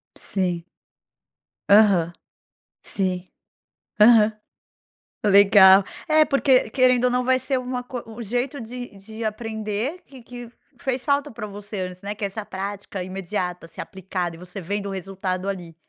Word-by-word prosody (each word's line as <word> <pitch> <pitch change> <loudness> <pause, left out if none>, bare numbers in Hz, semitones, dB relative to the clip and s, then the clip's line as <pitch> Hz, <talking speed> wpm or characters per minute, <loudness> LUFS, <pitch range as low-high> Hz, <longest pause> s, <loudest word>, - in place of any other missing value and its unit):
Sim. 180 -3 -2 1.1
Aham. 200 -5 +5 0.7
Sim. 185 -2 -2 0.7
Aham. 220 0 +7 0.9
Legal. 200 -1 +7 0.2
É, 310 0 +5
porque 275 -5 +3
querendo 255 0 +3
ou 250 - +3
não 250 0 +1
vai 260 0 +3
ser 265 -1 -1
uma 250 0 -4
coi 245 -1 -6
um 225 +1 -9
jeito 245 +5 -2
de 245 -1 -8
de 220 +3 -9
aprender 220 - -3
que 265 -2 -14
que 245 -1 -9 0.3
fez 260 -1 -2
falta 285 0 +1
para 225 -3 -7
você 205 -1 -7
antes, 180 0 -6
né, 205 +1 -5
que 215 - -8
é - - +2
essa 205 +2 -7
prática 195 0 -5
imediata 180 -2 -4
ser - - -8
aplicada 180 -2 -4
e - - -15
você 180 +2 -8
vendo 200 +3 -3
o - - -4
resultado 190 0 -3
ali. 175 -4 -6
210 Hz, 150 wpm, -23 LUFS, 190-245 Hz, 1.1 s, Aham